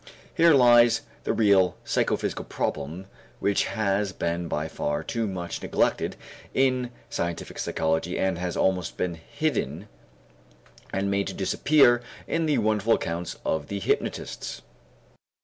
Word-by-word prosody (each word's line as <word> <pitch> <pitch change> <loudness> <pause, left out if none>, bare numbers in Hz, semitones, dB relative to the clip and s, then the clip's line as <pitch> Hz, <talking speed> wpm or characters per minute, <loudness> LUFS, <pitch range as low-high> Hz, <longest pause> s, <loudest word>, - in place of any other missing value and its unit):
Here 165 -2 +6
lies 120 -2 +6 0.2
the - - +1
real 95 -5 +3
psychophysical - - 0
problem 80 +7 -3 0.3
which 100 -1 +1
has 100 -2 0
been 85 0 -2
by 75 -1 -2
far 75 -2 -2
too 115 -2 -2
much 90 -3 -4
neglected - - 0 0.4
in 130 -2 +2 0.2
scientific 85 -1 -3
psychology 80 +2 -1
and 95 -3 0
has 90 -1 -3
almost 95 -2 0
been 90 -1 -1
hidden 95 - -3 1.0
and 100 +1 -1
made 100 -2 0
to - - -4
disappear 135 -5 +4 0.2
in 165 -1 0
the 150 - +2
wonderful 110 +1 +2
accounts 85 +1 -4
of 75 -2 -1
the 100 - -3
hypnotists. - - -2
100 Hz, 130 wpm, -26 LUFS, 85-120 Hz, 1.0 s, Here